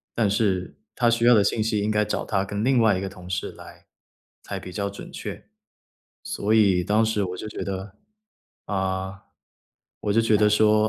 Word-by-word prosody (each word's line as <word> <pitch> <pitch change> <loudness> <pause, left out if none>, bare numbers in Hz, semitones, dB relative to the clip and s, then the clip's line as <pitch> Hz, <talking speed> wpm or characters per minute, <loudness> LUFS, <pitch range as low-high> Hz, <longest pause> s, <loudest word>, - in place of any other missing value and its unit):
但 110 -3 +2
是 100 -3 0 0.2
他 120 - +2
需 115 0 +2
要 120 0 +7
的 105 - +5
信 110 +2 +1
息 110 -1 0
应 105 +1 0
该 105 0 +2
找 - - -2
他 95 -2 0
跟 100 +2 -3
另 130 -1 +3
外 110 -4 +4
一 95 - -3
个 95 - -3
同 90 -2 -11
事 95 +1 -2
来 - - -14 0.6
才 - - -5
比 90 - -9
较 100 +1 -2
准 100 - -10
确。 - - -7 0.8
所 105 +2 -1
以 100 -5 +4
当 105 +5 +2
时 110 -2 0
我 90 -1 -4
就 110 - -6
觉 - - -6
得 95 0 -5 0.7
啊， 95 0 -3 0.8
我 105 - 0
就 115 - +4
觉 110 -1 +3
得 105 0 +4
说 110 0 +4
105 Hz, 215 characters per minute, -24 LUFS, 95-110 Hz, 0.8 s, 要